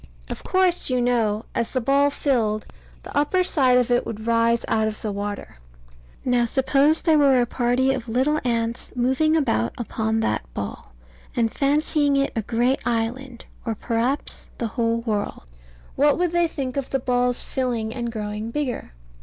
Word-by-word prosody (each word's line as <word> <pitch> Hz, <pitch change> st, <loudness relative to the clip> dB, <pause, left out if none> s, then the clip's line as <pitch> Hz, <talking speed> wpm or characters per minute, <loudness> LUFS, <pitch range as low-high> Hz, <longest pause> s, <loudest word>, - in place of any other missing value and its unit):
Of -, -, -6 dB
course, 370 Hz, -4 st, +2 dB
you 255 Hz, -1 st, +1 dB
know, 230 Hz, -3 st, +1 dB
as 235 Hz, -, -1 dB
the 260 Hz, -, -1 dB
ball 280 Hz, +3 st, +3 dB
filled, 230 Hz, -7 st, 0 dB, 0.4 s
the -, -, -10 dB
upper 295 Hz, +6 st, +2 dB
side 260 Hz, -8 st, +3 dB
of 250 Hz, -1 st, +1 dB
it 245 Hz, -, +3 dB
would 220 Hz, 0 st, -6 dB
rise 230 Hz, 0 st, +2 dB
out 220 Hz, -1 st, +1 dB
of 215 Hz, 0 st, -5 dB
the 215 Hz, -, -2 dB
water. 205 Hz, -, -5 dB, 0.7 s
Now, 245 Hz, -1 st, +3 dB
suppose 275 Hz, +5 st, +3 dB
there 315 Hz, -3 st, +4 dB
were 275 Hz, -3 st, +5 dB
a 240 Hz, -, +3 dB
party 250 Hz, +2 st, +1 dB
of 245 Hz, -3 st, -5 dB
little 265 Hz, +6 st, +1 dB
ants 230 Hz, -1 st, -1 dB
moving 265 Hz, +6 st, +2 dB
about 120 Hz, -, +1 dB
upon 220 Hz, -1 st, -1 dB
that 65 Hz, -, -2 dB
ball, -, -, -6 dB, 0.4 s
and 230 Hz, -2 st, +1 dB
fancying 290 Hz, 0 st, +2 dB
it 275 Hz, 0 st, +1 dB
a 225 Hz, -, 0 dB
great 240 Hz, +5 st, 0 dB
island, 240 Hz, +2 st, -3 dB, 0.2 s
or 230 Hz, -2 st, -2 dB
perhaps 240 Hz, +6 st, -1 dB
the 230 Hz, -, -2 dB
whole 230 Hz, 0 st, 0 dB
world 210 Hz, -, -3 dB, 0.5 s
what 290 Hz, +1 st, +3 dB
would 350 Hz, -1 st, +1 dB
they 345 Hz, 0 st, +2 dB
think 270 Hz, -4 st, -4 dB
of 275 Hz, -, -2 dB
the 270 Hz, -, +1 dB
ball's 250 Hz, -1 st, 0 dB
filling 235 Hz, -4 st, -2 dB
and 235 Hz, -2 st, -3 dB
growing 210 Hz, 0 st, -4 dB
bigger? 250 Hz, -, -3 dB
245 Hz, 170 wpm, -23 LUFS, 225-275 Hz, 0.7 s, were